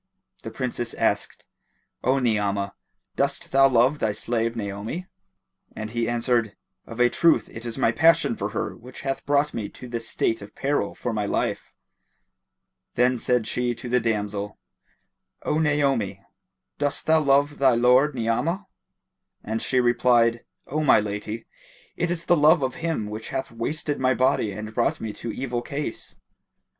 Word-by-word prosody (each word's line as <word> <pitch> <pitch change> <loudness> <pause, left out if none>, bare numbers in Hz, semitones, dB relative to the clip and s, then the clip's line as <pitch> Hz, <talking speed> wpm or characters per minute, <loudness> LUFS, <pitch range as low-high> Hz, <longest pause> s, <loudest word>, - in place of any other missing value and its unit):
The - - -6
Princess 120 -2 -3
asked, - - -1 0.6
"O 130 +2 +3
Ni'amah, 105 -5 0 0.4
dost - - -1
thou 135 0 +6
love 130 +4 +3
thy 110 -1 0
slave 115 +1 -1
Naomi?"; 105 - -4 0.7
and 110 0 -5
he 120 0 -1
answered, 120 -2 0 0.3
"Of 115 - -9
a 120 - +6
truth 165 +6 +3
it 115 +1 -8
is 115 - -5
my 115 - +3
passion 160 -3 +4
for 100 0 -3
her 110 - -3
which 125 +2 -11
hath 135 0 -2
brought 145 +1 +2
me 110 -3 -4
to 125 - -11
this 115 -1 -4
state 115 - 0
of 100 +1 -11
peril 140 +2 -1
for 120 - -3
my 105 -2 -1
life." - - -2 1.2
Then 125 0 +3
said 125 -2 +1
she 120 +1 -1
to 125 - -8
the 125 +1 +3
damsel, 105 -3 -2 0.9
"O 155 - 0
Naomi, 135 -11 +1 0.6
dost 145 -1 0
thou 160 0 +5
love 145 0 +2
thy 130 -3 +5
lord 125 +4 +4
Ni'amah?"; 125 - -1 0.8
and 110 +1 -3
she 130 - +1
replied, 120 -1 +3 0.2
"O 155 +3 -2
my 135 - +6
lady, 105 +2 -4 0.5
it 175 0 -1
is 170 -1 -2
the 175 - +4
love 155 0 +5
of 130 - -1
him 165 -10 -1
which 110 +1 -6
hath 135 0 -3
wasted 145 +6 -3
my 130 -1 +2
body 130 -5 +2
and 105 +2 -7
brought 120 +1 +1
me 110 -2 -5
to 115 - -5
evil 125 -1 -3
case." 140 -2 -5
120 Hz, 160 wpm, -24 LUFS, 110-140 Hz, 1.2 s, thou